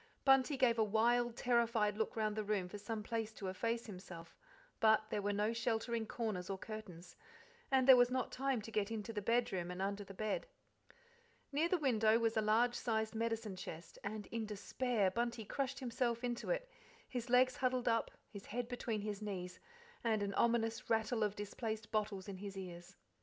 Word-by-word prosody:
Bunty 270 +1 +5
gave 240 -3 +3
a - - +6
wild, 235 +3 +2
terrified 235 -4 +2
look 220 +1 -1
round 215 -2 0
the 215 - -1
room 200 -3 0
for 205 +3 -8
some 215 +1 -4
place 225 0 -2
to 195 -3 -4
efface 230 +5 -1
himself, 180 -4 -9 0.4
but 220 -1 +5
there 205 - 0
were 205 +1 0
no 210 +2 +1
sheltering 230 0 -1
corners 210 -7 -3
or 195 - -2
curtains, 190 -5 -8 0.5
and 265 -1 +3
there 265 - +11
was 245 -1 +5
not 255 0 -1
time 265 -4 0
to 225 - -8
get 210 -1 0
into 225 0 -4
the 205 - -2
bedroom 195 -6 +1
and 180 0 -5
under 200 +1 -1
the 195 0 -11
bed. 215 - -2 1.0
Near 310 +4 +2
the 365 - +3
window 225 -7 +4
was 230 -1 +1
a 220 - +3
large 225 +3 +3
sized 220 -2 -1
medicine 225 -3 -2
chest, 170 -2 -8
and 210 0 -4
in 230 -2 -2
despair 210 0 0
Bunty 235 0 -1
crushed 275 +4 -2
himself 240 -1 -1
into 240 -1 -2
it, - - 0 0.4
his 245 -1 -4
legs 255 +1 +5
huddled 255 -1 0
up, 230 -1 +2 0.2
his 200 -1 -10
head 240 +2 -3
between 240 -3 -2
his 210 0 -4
knees, 180 -4 -5 0.4
and 220 -3 +2
an 200 0 -2
ominous 230 0 +1
rattle 225 0 +1
of 210 -1 +1
displaced 215 +1 -4
bottles 210 -3 -1
in 195 -2 -5
his 195 0 -7
ears. 175 0 -8
220 Hz, 190 wpm, -37 LUFS, 205-240 Hz, 1.0 s, there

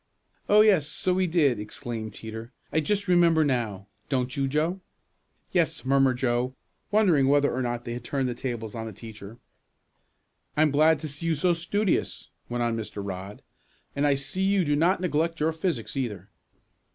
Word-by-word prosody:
"Oh, 210 +1 +7
yes, 190 -9 +4
so 185 +4 -1
we 185 0 +1
did!" 150 -9 +2
exclaimed 110 0 -6
Teeter. 110 +2 -8 0.2
"I 160 - +3
just 200 +5 -1
remember 170 -3 +4
now; 115 -8 -1 0.2
don't 130 -2 -1
you, 135 -1 0
Joe?" 160 +7 0 0.7
"Yes," 165 -5 0
murmured 135 -1 +3
Joe, 125 0 0 0.3
wondering 180 -11 +4
whether 145 +1 +3
or 130 - -1
not 120 -1 -3
they 120 - -4
had 120 0 -6
turned 135 +1 -1
the 125 - -2
tables 120 -4 -5
on 115 -1 -5
the 110 - -7
teacher. 110 0 -10 1.2
"I 155 - +5
am 155 - +3
glad 155 +3 +4
to 155 - -4
see 145 +3 -4
you 165 - +2
so 175 +4 +2
studious," 180 +4 -1 0.2
went 120 0 -1
on 115 -1 0
Mr. 110 -2 -6
Rodd. 95 +1 -7 0.5
"And 145 +1 +2
I 140 - +3
see 140 +7 -4
you 195 -1 +2
do 145 0 +2
not 175 +5 +2
neglect 165 -1 0
your 160 +2 +1
physics, 165 0 -3
either. 120 -7 -4
140 Hz, 180 wpm, -26 LUFS, 120-165 Hz, 1.2 s, Oh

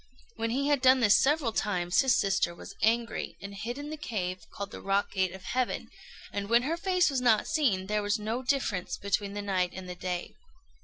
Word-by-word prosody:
When 230 +1 -2
he 275 +4 0
had 290 -3 +2
done 260 0 +6
this 210 -3 +6
several 280 -4 +2
times, 180 -4 +1
his 260 -3 +3
sister 190 -3 +1
was - - -10
angry, 230 +2 0
and 200 0 -8
hid 235 +5 -5
in 290 +1 -6
the 310 - -5
cave 185 -9 -3
called 200 0 -6
the - - -8
Rock 195 +1 0
Gate 190 -2 0
of 190 0 -10
Heaven; 245 0 -2 0.4
and 200 0 -3
when 235 +1 +5
her 310 +5 0
face 360 -1 +2
was 265 -2 0
not 230 -4 +4
seen, 255 - +1
there 210 +2 0
was 205 0 +1
no 220 +4 -3
difference 250 -9 -1
between 200 0 -1
the 205 - -3
night 185 -3 0
and 185 0 -7
the 180 - -5
day. 180 0 -4
210 Hz, 215 wpm, -29 LUFS, 190-255 Hz, 0.4 s, done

